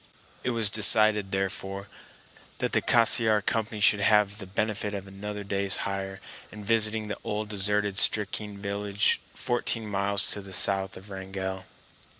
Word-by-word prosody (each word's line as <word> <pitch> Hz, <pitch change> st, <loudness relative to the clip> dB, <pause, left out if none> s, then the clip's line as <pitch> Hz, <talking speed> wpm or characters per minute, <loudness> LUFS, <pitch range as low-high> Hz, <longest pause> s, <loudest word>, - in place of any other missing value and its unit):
It -, -, -1 dB
was 115 Hz, -4 st, +3 dB
decided, 110 Hz, -1 st, +5 dB
therefore, 95 Hz, +1 st, -4 dB, 0.7 s
that -, -, -2 dB
the -, -, +3 dB
Cassiar 115 Hz, -2 st, +3 dB
Company 110 Hz, 0 st, -1 dB
should 105 Hz, 0 st, +3 dB
have 105 Hz, 0 st, +2 dB
the 100 Hz, -, -7 dB
benefit 105 Hz, +1 st, -3 dB
of 100 Hz, -1 st, -6 dB
another 100 Hz, +1 st, -7 dB
day's 100 Hz, -1 st, 0 dB
hire, 95 Hz, -1 st, -5 dB, 0.3 s
in 105 Hz, -1 st, -10 dB
visiting 110 Hz, 0 st, +1 dB
the 105 Hz, -, -6 dB
old 105 Hz, 0 st, -4 dB
deserted 105 Hz, 0 st, 0 dB
Stickeen 105 Hz, -1 st, +2 dB
village 100 Hz, 0 st, -1 dB
fourteen 120 Hz, -2 st, -2 dB
miles 100 Hz, 0 st, -1 dB
to 100 Hz, -, -3 dB
the 95 Hz, -1 st, -11 dB
south 95 Hz, +1 st, +2 dB
of 95 Hz, +2 st, -14 dB
Wrangell. 95 Hz, -1 st, -6 dB
100 Hz, 150 wpm, -26 LUFS, 100-105 Hz, 0.7 s, decided